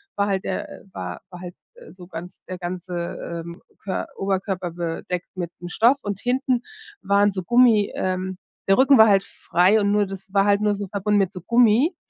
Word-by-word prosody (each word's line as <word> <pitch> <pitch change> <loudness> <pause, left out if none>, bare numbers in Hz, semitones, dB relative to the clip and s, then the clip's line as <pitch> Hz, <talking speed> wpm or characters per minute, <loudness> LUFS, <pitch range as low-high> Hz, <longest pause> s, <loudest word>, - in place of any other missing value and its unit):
war 200 0 +1
halt 195 -2 -1
der 190 - -5
war 90 -1 -6
war 180 -1 -11
halt, 180 -1 -8 0.2
äh, - - -14
so 180 -1 -13
ganz 175 +1 -9
der 185 - -5
ganze, 175 -1 -5
ähm, 170 0 -10 0.2
Kör 190 -1 -3
Oberkörper 190 -2 -2
bedeckt 175 +1 -4
mit'm 175 -1 -6
Stoff 235 +8 +4
und 200 -2 -4
hinten 255 0 0 0.4
waren 200 +1 +3
so 185 -1 -4
Gummi 230 0 +4
ähm, 185 0 -2 0.3
der 195 - +5
Rücken 270 +1 +6
war 220 - +8
halt 195 -2 +4
frei 185 +5 +2
und 200 0 +1
nur 205 0 +3
das 195 0 -10
war 195 -1 +4
halt 205 0 +3
nur 210 -1 +2
so 200 0 -5
verbunden 205 +2 0
mit 195 -1 0
so 180 - -8
Gummi. 235 - +3
195 Hz, 195 wpm, -23 LUFS, 180-210 Hz, 0.4 s, war